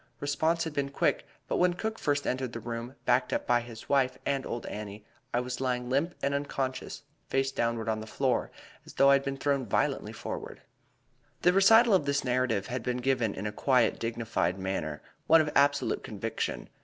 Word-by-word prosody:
Response 160 +4 +1
had 160 - -4
been 140 -1 -1
quick, 140 - 0 0.2
but - - 0
when 180 -1 +3
Cook 220 +4 -3
first 145 -1 0
entered 130 -1 -2
the 115 - -4
room, 115 +3 -6
backed 125 +1 +2
up - - -1
by 120 0 +3
the 115 -2 -10
wife 135 -2 +2
and 140 -1 -1
old 120 - -4
Annie, 105 0 -7 0.3
I 120 - +1
was 125 0 -5
lying 125 -1 -1
limp 155 +7 +1
and 140 - +1
unconscious, 135 -2 -3 0.3
face 135 0 +1
downward 115 -3 -1
on 110 -1 0
the 110 - -8
floor, - - 0 0.3
as - - -14
though 140 0 +6
I - - +7
had 140 0 +3
been 135 0 -3
thrown 140 -1 0
violently 110 - 0
forward." - - -7 0.8
The 180 - +5
recital 225 +4 +6
of 185 -7 +3
this 140 0 +1
narrative 125 -5 +1
had 125 0 -3
been 125 +2 -2
given 125 -4 0
in 100 - -5
a 105 - -1
quiet, 125 +1 +2
dignified 115 -6 -1
manner 95 -6 -3 0.2
one 165 +1 +7
of 155 -1 +1
absolute 140 0 +2
conviction. - - -4
130 Hz, 195 wpm, -29 LUFS, 115-140 Hz, 0.8 s, I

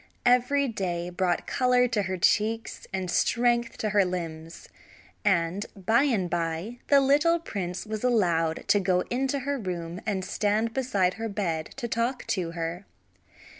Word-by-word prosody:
Every 250 +3 +3
day 180 -6 -3
brought 175 -1 0
color 250 -1 +3
to 225 -3 +1
her 190 -1 -3
cheeks, 220 +5 0
and 190 -2 -3
strength 235 +2 +1
to 215 - -1
her 205 -1 +4
limbs, 165 -3 -5 0.6
and 190 0 +1
by 220 +7 +2
and 215 -10 +1
by 170 +7 -3
the 280 - +6
little 295 +5 +4
prince 190 - -5
was 215 0 -5
allowed 170 -10 +1
to 205 - +5
go 180 -1 +2
into 270 +2 0
her 280 +1 -2
room 175 -3 -5
and 190 -3 -1
stand 215 +3 0
beside 205 -9 +1
her 225 - -2
bed 170 -6 -2
to 245 -3 -3
talk 235 +3 -1
to 175 -4 -1
her. 170 +3 -4
205 Hz, 155 wpm, -27 LUFS, 175-240 Hz, 0.6 s, the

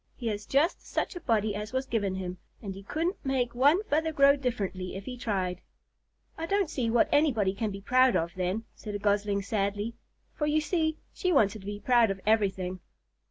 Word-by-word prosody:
He 245 - -9
has 210 0 -4
just 295 +6 +2
such - - -2
a - - -4
body 220 -8 +1
as 210 +3 -5
was 260 +1 0
given 205 -7 -1
him, 185 -1 -5 0.2
and 200 -3 -6
he 195 - -9
couldn't 330 - -2
make 260 -3 0
one 290 - +4
feather 320 -3 0
grow 280 -2 +6
differently 200 -9 -3
if 195 +1 -7
he 255 - -5
tried." 190 -7 -2 0.8
"I 330 - -3
don't 395 -3 +1
see 240 -4 -1
what 230 0 +4
anybody 240 -11 +3
can 215 +2 -2
be 195 0 -7
proud 255 +4 +4
of, 165 +1 0
then," 185 +4 -1
said 210 -2 -7
a - - +1
Gosling 205 0 +1
sadly; 205 +2 -1 0.4
for, 300 - -1
you 300 +1 +3
see, 315 0 0 0.2
she 365 - 0
wanted 220 - +3
to 195 - -11
be 205 0 -4
proud 235 +1 +4
of 195 0 -2
something. 190 -4 +1
220 Hz, 205 wpm, -29 LUFS, 200-275 Hz, 0.8 s, grow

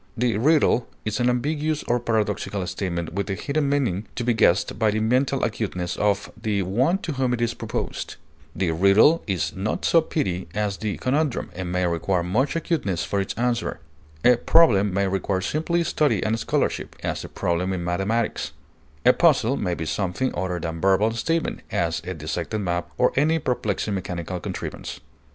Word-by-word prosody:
The 120 -1 +1
riddle 140 -3 +3 0.2
is 110 +2 -1
an 120 0 +3
ambiguous 150 +5 0
or 120 +1 +1
paradoxical 105 -4 -1
statement 85 -2 -3
with 100 +2 -2
a 95 - -1
hidden 140 +5 -1
meaning 120 -9 0
to 120 - -2
be 120 0 +2
guessed 95 -4 +2
by 110 - +3
the 105 +1 0
mental 130 +4 +1
acuteness 100 -6 -2
of 100 -1 0
the 105 -3 -1
one 125 - +2
to 165 - -2
whom 130 -3 0
it - - -8
is 120 0 +1
proposed; - - -4 0.4
the 85 -1 0
riddle 100 - +5
is 95 -4 -1
not 95 +3 -2
so 165 - +5
petty 95 - -2
as 105 -2 -1
the 105 -1 -3
conundrum, 140 +1 0
and 90 -1 -4
may 90 0 +1
require 85 +1 0
much 120 - 0
acuteness 150 - -1
for 100 - -1
its 95 - -4
answer; 120 0 -1 0.5
a 125 -1 +7
problem 105 -11 +4
may 100 +2 +1
require 95 0 0
simply 160 - 0
study 150 -2 +1
and 110 +1 0
scholarship, - - -1
as - - -2
a - - -8
problem 90 +2 -1
in 90 -2 -2
mathematics; 95 +6 -1 0.5
a 125 - +8
puzzle 135 -7 +3
may 90 -8 -1
be 80 - -4
in - - -5
something 95 +9 -1
other 90 0 -2
than 80 0 -4
verbal 95 +3 +3
statement, 165 +8 -1
as - - 0
a - - -3
dissected 110 - -3
map 85 -3 -2
or 125 - +3
any 155 +4 +3
perplexing 110 -7 -1
mechanical 90 -1 -4
contrivance. - - -6
110 Hz, 180 wpm, -24 LUFS, 95-130 Hz, 0.5 s, a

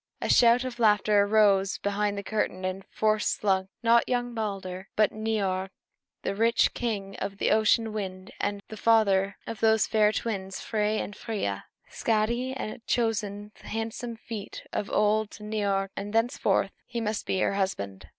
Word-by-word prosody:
A - - -3
shout 240 +1 +6
of 250 -2 -6
laughter 210 -2 +4
arose 200 -2 +3
behind 205 0 -1
the 200 - -4
curtain, 190 -3 -2
and 185 +1 -3
forth 215 0 +1
slunk 190 -3 +1
not 235 0 +4
young 245 -1 -1
Balder, 195 -4 -4
but 215 -1 +3
old 215 - -9
Niörd 195 -4 -1 0.5
the - - -1
rich, 230 +3 +3
king 200 -5 -3
of 200 0 -4
the - - +1
ocean 220 +1 +3
wind, 190 -3 -5 0.4
the 215 - -8
father 200 -4 +3
of 230 - -6
those 220 -1 +4
fair 215 -1 +3
twins, 195 -4 -3
Frey 215 -1 0
and 205 - -4
Freia. 195 - -3 0.3
Skadi 235 +4 0
had 215 -1 -6
chosen 210 -3 -1
the - - -13
handsome 225 +2 -4
feet 220 -2 -7
of 205 - -2
old 210 0 +2
Niörd, 205 -2 -1
and 205 +1 -5
thenceforth 230 +3 +1 0.2
he 240 -1 -3
must 215 -2 -2
be - - 0
her 185 - +1
husband. 100 - -3
210 Hz, 160 wpm, -27 LUFS, 195-225 Hz, 0.5 s, shout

